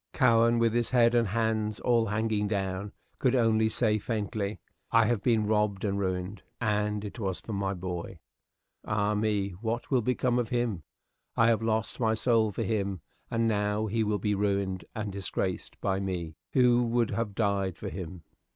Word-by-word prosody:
Cowen, 115 -3 +4
with 115 -1 +2
his 120 0 +1
head 120 -2 +4
and 120 -2 +3
hands 110 0 0
all 115 -2 +2
hanging 105 0 0
down, 100 -1 -2 0.3
could 130 -1 +2
only 110 -2 +3
say, 110 -1 +1
faintly, 105 -1 -3 0.3
"I 115 -1 +5
have 115 -2 +1
been 110 -1 +2
robbed 105 -2 +1
and 100 -1 0
ruined, 95 +1 -2 0.2
and 105 -2 0
it 105 +4 -7
was 95 -4 -2
for 110 - -7
my 100 -1 -1
boy. 90 -1 -5 0.7
Ah, 105 0 0
me! 105 -2 0
what 115 +3 -3
will 130 -2 +4
become 125 +1 +1
of 120 - -1
him? 120 -7 -1 0.6
I 115 - +5
have 115 -1 +2
lost 110 -1 -1
my 110 -2 +2
soul 115 -1 +2
for 100 - -3
him, 100 -4 -1 0.3
and 115 -1 +1
now 105 0 0
he 110 +1 0
will 105 -1 0
be 105 +1 0
ruined 100 -2 0
and 105 -2 -3
disgraced 95 -1 -3
by 95 -1 0
me, 90 -4 -3 0.2
who 125 -2 +4
would 120 -1 +1
have 110 -4 -2
died 100 -4 0
for - - -5
him." 90 -2 -7
105 Hz, 180 wpm, -29 LUFS, 100-115 Hz, 0.7 s, I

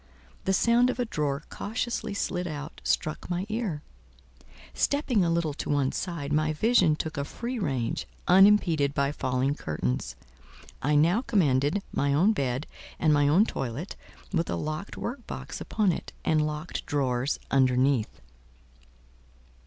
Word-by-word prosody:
The 190 - +2
sound 235 +5 +4
of - - -2
a 245 - 0
drawer 150 -7 -2
cautiously 220 -1 -3
slid 180 -3 -2
out 150 -1 -7
struck 155 +3 -1
my 180 +1 -1
ear; 210 -9 -2 0.9
stepping 275 -8 +1
a 170 - +1
little 165 -3 0
to - - -6
one 140 -2 +2
side, 165 -6 -3
my 155 +1 +2
vision 185 -2 +3
took 155 0 -5
a 140 - 0
free 240 - -5
range, 135 - -2 0.2
unimpeded 180 -7 +5
by 140 0 +1
falling 130 -1 0
curtains. 65 - -3 0.7
I 150 +3 +2
now 170 +9 +4
commanded 170 - +2
my 140 0 +1
own 190 +9 +4
bed 135 - -1 0.3
and 155 -1 +3
my 145 -1 +4
own 175 +9 +5
toilet, 135 - -4 0.4
with 170 -2 0
a - - 0
locked 155 +6 -4
work 250 +4 -5
box - - -6
upon 210 -4 +1
it, - - -6
and 155 -1 +2
locked 150 +2 -4
drawers 135 -3 0
underneath. 130 -2 +2
155 Hz, 145 wpm, -27 LUFS, 140-195 Hz, 0.9 s, unimpeded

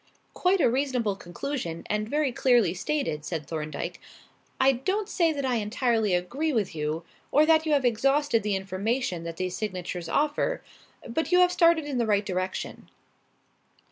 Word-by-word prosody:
"Quite 370 +2 +2
a - - +5
reasonable 250 -4 0
conclusion 175 - -5
and 210 +1 -2
very 295 -1 +1
clearly 240 -8 +3
stated," 190 - -2
said 155 -1 -4
Thorndyke. 155 0 -5 0.6
"I 265 +1 +6
don't 375 - -1
say 335 -3 +2
that 280 -3 -3
I 250 -2 +1
entirely 220 -2 +1
agree 270 - -1
with 220 -8 0
you, 155 +1 -2 0.3
or 300 +2 +5
that 320 0 +4
you 305 - +2
have 280 -3 +2
exhausted 270 +2 +2
the 205 -1 0
information 190 0 -2
that 165 -1 -6
these 185 -1 -2
signatures 180 -4 -4
offer. 300 - 0 0.4
But 320 +8 -2
you 360 - +5
have 360 0 +5
started 335 -3 +4
in 275 -4 -2
the 235 - +1
right 205 -1 +2
direction." 185 -1 -4
235 Hz, 165 wpm, -27 LUFS, 185-290 Hz, 0.6 s, I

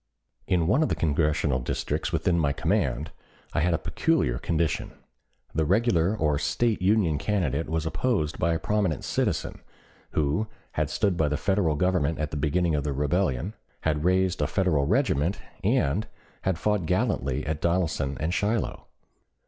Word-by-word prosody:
In 85 -3 +2
one 110 - +3
of 155 - +2
the - - +1
Congressional 75 -3 +1
districts 65 - -2
within 85 -1 +1
my 70 -3 +2
command - - 0 0.4
I - - +1
had 85 +1 +2
a - - +1
peculiar - - 0
condition. 80 -2 -1 0.6
The 80 - +1
regular 100 +1 +2
or 75 -5 +1
State 115 +4 0
Union 90 -6 +2
candidate 80 -7 -1
was 80 0 -1
opposed 80 -3 -1
by 85 0 +2
a - - +1
prominent 100 -3 0
citizen, - - -1 0.5
who 75 +8 +1 0.2
had - - -1
stood 100 -5 0
by 80 - +2
the 75 0 0
Federal 90 -1 +1
Government 80 -2 +1
at 75 -1 -3
the - - -4
beginning 80 +4 +1
of 75 -2 0
the 70 -1 -1
rebellion, 75 - 0 0.3
had 75 -1 0
raised 95 +1 +2
a - - +2
Federal 80 -8 +1
regiment, 100 - +1 0.2
and 95 +11 +1 0.3
had 95 -3 0
fought 105 -3 0
gallantly 90 - 0
at 80 0 -3
Donelson 80 -6 0
and 80 +3 -1
Shiloh. 105 +6 -1
80 Hz, 160 wpm, -26 LUFS, 75-95 Hz, 0.6 s, one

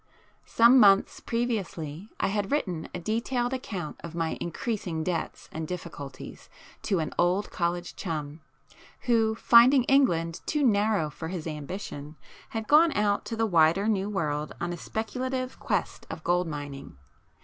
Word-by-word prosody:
Some 235 +3 +6
months 200 -3 +5
previously 205 -7 -3
I - - +1
had 205 0 -2
written 180 - -1
a - - -5
detailed 240 +6 -1
account 190 - -5
of 170 0 -7
my 165 -1 -1
increasing 170 -3 -3
debts 170 -1 -3
and 160 0 -5
difficulties 150 -6 -8 0.3
to 195 - 0
an 155 -3 -2
old 180 +4 +2
college 175 0 -2
chum, 155 -3 -5 0.6
who 225 -2 +2
finding 245 +4 +6
England 170 -12 +2
too 300 -1 +1
narrow 205 -8 +2
for 160 - -7
his 170 -2 -5
ambition 150 -1 -6 0.3
had 220 -1 -4
gone 315 +2 +6
out 205 -1 +1
to 230 - -4
the 225 0 +1
wider 170 +1 +3
New 200 -2 +1
world 150 -7 -2
on 175 0 -2
a - - -6
speculative 255 +6 -4
quest 205 -7 -2
of 160 0 -7
gold 175 0 +1
mining. 145 - -7
185 Hz, 150 wpm, -27 LUFS, 160-225 Hz, 0.6 s, Some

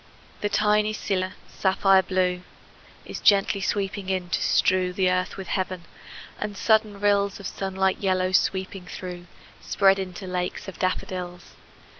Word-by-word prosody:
The 205 - 0
tiny 210 +1 +2
scilla, 185 -3 -2
sapphire 190 0 +3
blue, 185 -1 0 0.6
Is - - -6
gently 200 0 +3
sweeping 195 0 -2
in, 185 -2 -1
to - - 0
strew 185 -1 +2
The 185 -1 +2
earth 185 +1 -1
with 195 - -7
heaven; 185 -2 -2 0.6
and 205 -1 -4
sudden 215 0 +2
rills 200 -1 +2
Of 200 - -10
sunlit 190 0 -1
yellow, 185 -1 +1
sweeping 190 0 0
through, 180 -1 -7 0.3
Spread 195 -1 +3
into 190 0 -6
lakes 180 +1 -3
of 190 - -9
daffodils. 180 -1 -3
190 Hz, 140 wpm, -25 LUFS, 185-200 Hz, 0.6 s, sapphire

